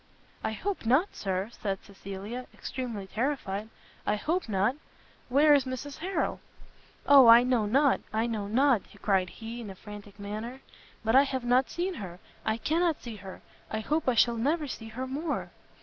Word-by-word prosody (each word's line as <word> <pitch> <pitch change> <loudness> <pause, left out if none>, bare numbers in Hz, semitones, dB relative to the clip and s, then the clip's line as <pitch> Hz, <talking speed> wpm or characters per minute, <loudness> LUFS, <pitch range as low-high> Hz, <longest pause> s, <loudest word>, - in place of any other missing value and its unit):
"I 220 - -1
hope 395 - -3
not, 290 - +3
Sir!" 190 +2 -2
said 195 -4 -3
Cecilia, 200 +5 -7
extremely 235 -6 -5
terrified, 220 -2 -2 0.3
"I 210 - +1
hope 320 - -1
not! 200 +5 +2 0.5
Where 290 +4 +6
is 280 -2 +4
Mrs 260 +3 -5
Harrel?" 360 0 -1 0.7
"O 275 -3 +8
I 230 +1 +9
know 245 -4 +2
not! 275 +5 +3
I 220 +1 +1
know 220 -4 -2
not!" 250 +1 +3 0.2
cried 190 -3 +2
he, 230 +4 -7
in 215 - -7
a 190 - -8
frantic 205 0 -11
manner, 215 +6 -6 0.4
"but 225 +2 +3
I 270 - +9
have 265 -2 -2
not 250 +2 +3
seen 360 +2 -2
her, 180 -3 -7 0.3
I 220 0 0
cannot 325 +5 +1
see 230 -3 -7
her, 190 -1 -10 0.3
I 220 - -2
hope 300 +3 0
I 250 - +2
shall 235 +1 +4
never 295 +6 0
see 225 -3 -6
her 240 +4 -5
more! 290 +4 -3
235 Hz, 175 wpm, -29 LUFS, 210-275 Hz, 0.7 s, I